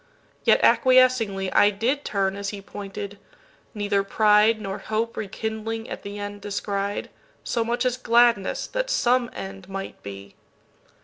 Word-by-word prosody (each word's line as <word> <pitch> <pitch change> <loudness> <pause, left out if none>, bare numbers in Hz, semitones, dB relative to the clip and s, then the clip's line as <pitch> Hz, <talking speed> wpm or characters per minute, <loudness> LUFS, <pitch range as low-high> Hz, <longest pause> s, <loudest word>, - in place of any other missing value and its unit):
Yet - - +4
acquiescinglyI 230 -7 +4
did 265 +7 0
turn 195 -1 0
as 200 0 -4
he 205 - -6
pointed: 200 +1 -7 0.6
neither 205 -1 0
prideNor 210 -1 +3
hope 225 +1 -1
rekindling 220 +2 -4
at - - -5
the 200 +1 -7
end 205 0 -6
descried, 200 0 -3 0.3
So 235 - 0
much 240 +3 -1
as 250 -1 +1
gladness 235 -4 +3
that - - -3
some 245 - +2
end 195 -1 -8
might 195 0 -6
be. 100 0 -9
210 Hz, 130 wpm, -24 LUFS, 195-230 Hz, 0.6 s, Yet